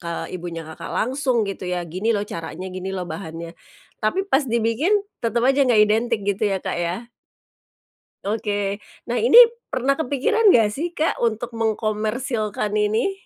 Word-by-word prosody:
ke 170 - -7 0.3
ibunya 170 -2 -5
Kakak 165 +1 -8
langsung 255 -1 0
gitu 195 - -5
ya, 180 -1 -2
"Gini 185 +8 -1
loh 205 0 -1
caranya, 165 +3 -6
gini 185 +1 -5
loh 185 - -3
bahannya." 165 -2 -7 0.5
Tapi 380 - 0
pas 275 +1 +3
dibikin, 235 - +1 0.3
tetap 235 +1 +1
aja 275 +1 +4
nggak 240 -4 +4
identik 220 +1 +1
gitu 200 +1 -1
ya, 195 -1 0
Kak - - -3
ya? 175 +7 -3 1.2
Oke. 205 -1 -2 0.3
Nah 245 - +1
ini, 470 0 +5 0.3
pernah 260 +2 +1
kepikiran 320 - +2
nggak 225 - +5
sih 335 +7 -4
Kak 315 - 0
untuk 235 +1 -1
mengkomersilkan 215 0 -1
ini? 215 - +1
215 Hz, 155 wpm, -22 LUFS, 195-250 Hz, 1.2 s, ini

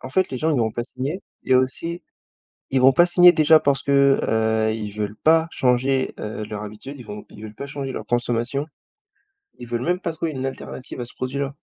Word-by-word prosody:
en 130 - -7
fait 185 +6 +1
les 130 - -4
gens 160 +4 +1
ils 155 - +2
n'iront 115 -3 +1
pas 120 - -2
signer 145 +9 -3 0.2
et 130 - +3
aussi, 150 +7 0 0.7
ils 135 -1 +2
vont 130 +1 +7
pas 175 +6 +5
signer 175 0 +7
déjà 155 0 +5
parce 140 -1 +1
que, 140 -1 +4 0.5
heu, - - 0
ils 105 -2 -5
veulent 105 0 -4
pas 160 +5 +3
changer, 130 0 +1
heu, 105 0 -5
leur 105 0 -6
habitude. 110 +7 -9
Ils 125 - -10
vont 105 0 -8
ils 105 - -13
veulent 110 0 -9
pas 140 - -7
changer 135 -2 -5
leur - - -6
consommation. 120 +4 -1 0.9
Ils 120 - -8
veulent 120 +1 -3
même 180 +4 0
pas 165 - -3
trouver 160 0 -3
une 130 -1 -5
alternative 130 -1 -7
à 120 - -3
ce - - -12
produit-là. 140 +2 -3
130 Hz, 220 wpm, -22 LUFS, 120-150 Hz, 0.9 s, vont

